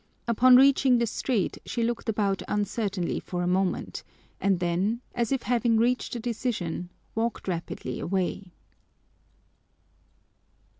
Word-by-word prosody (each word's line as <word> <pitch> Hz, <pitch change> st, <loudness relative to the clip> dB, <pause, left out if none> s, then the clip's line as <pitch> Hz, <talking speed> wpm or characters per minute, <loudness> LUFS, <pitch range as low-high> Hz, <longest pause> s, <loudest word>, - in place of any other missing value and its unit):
Upon 250 Hz, +2 st, +6 dB
reaching 265 Hz, -1 st, +6 dB
the 235 Hz, -, +2 dB
street 225 Hz, -2 st, -1 dB
she 235 Hz, -, -2 dB
looked 235 Hz, 0 st, -2 dB
about 200 Hz, -3 st, 0 dB
uncertainly 205 Hz, -3 st, -1 dB
for 175 Hz, -1 st, -4 dB
a -, -, 0 dB
moment 185 Hz, 0 st, -1 dB, 0.4 s
and 195 Hz, -3 st, +2 dB
then, 180 Hz, +6 st, 0 dB
as 235 Hz, 0 st, -1 dB
if 270 Hz, -2 st, 0 dB
having 235 Hz, -1 st, +2 dB
reached 245 Hz, +2 st, +1 dB
a -, -, -3 dB
decision, 220 Hz, -7 st, -3 dB, 0.2 s
walked 225 Hz, -1 st, -2 dB
rapidly 170 Hz, -2 st, -4 dB
away. 190 Hz, 0 st, -2 dB
220 Hz, 120 wpm, -27 LUFS, 185-240 Hz, 0.4 s, Upon